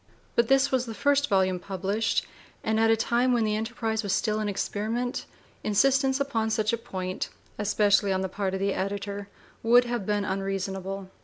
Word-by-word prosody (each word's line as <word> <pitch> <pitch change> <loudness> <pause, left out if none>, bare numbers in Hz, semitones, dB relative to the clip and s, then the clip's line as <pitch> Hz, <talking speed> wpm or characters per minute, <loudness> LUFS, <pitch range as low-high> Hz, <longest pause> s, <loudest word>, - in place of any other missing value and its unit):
But 235 -1 +3
this 270 +2 +4
was 255 -2 +1
the 225 - -6
first 285 +2 +2
volume 190 -2 +2
published, 195 +4 -1 0.4
and 220 0 +1
at 225 0 +4
a 225 - +4
time 240 +3 +2
when 235 -2 +2
the 215 -1 +1
enterprise 220 0 -2
was 200 -3 -1
still 215 -2 +1
an 210 -1 -1
experiment 220 +5 -2 0.4
insistence 270 +5 +3
upon 230 -6 0
such 215 0 +1
a - - +2
point, 185 -5 -4 0.3
especially 205 -1 +3
on 190 0 +1
the 190 - -1
part 190 0 -2
of - - -3
the 195 0 +1
editor, 200 +1 -3 0.3
would 240 +2 +6
have 240 -5 -3
been 205 -1 +1
unreasonable. 195 0 -3
215 Hz, 180 wpm, -27 LUFS, 195-235 Hz, 0.4 s, would